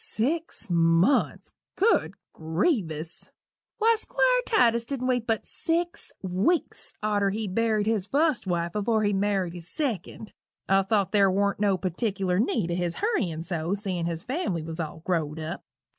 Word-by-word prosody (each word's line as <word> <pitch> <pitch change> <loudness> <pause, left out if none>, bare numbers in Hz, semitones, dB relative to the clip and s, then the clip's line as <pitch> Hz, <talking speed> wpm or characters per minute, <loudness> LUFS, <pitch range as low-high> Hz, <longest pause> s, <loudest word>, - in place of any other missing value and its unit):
Six 280 +1 -2
months! 170 +8 +2 0.2
Good 450 +4 +2 0.2
grievous! 160 - -1 0.5
Why, 455 0 +4
Squire - - +2
Titus 235 - +3
dident 260 -2 -2
wait 245 -2 0
but 225 -2 0
six 340 +1 -2
weeks 190 - 0
arter 205 -2 +2
he 215 +2 -3
buried 215 +1 +1
his 215 -3 0
fust 290 -4 +1
wife 170 -1 -1
afore 215 +1 +1
he 205 0 +2
married 195 -3 0
his 175 -1 -8
second. 220 - -3 0.3
I 195 0 +4
thought 200 0 +1
ther 200 -2 +4
wa'n't 200 +1 +1
no 200 -2 +2
partickler 185 0 -1
need 215 -6 0
o' - - 0
his 175 -1 -1
hurryin' 190 - -1
so, 175 +1 -2
seein' 185 -5 -3
his 165 -1 -4
family 255 - -2
was 160 +1 -7
all 160 0 -5
grow'd 160 -4 -1
up. 160 +2 -5
200 Hz, 155 wpm, -26 LUFS, 175-235 Hz, 0.5 s, Why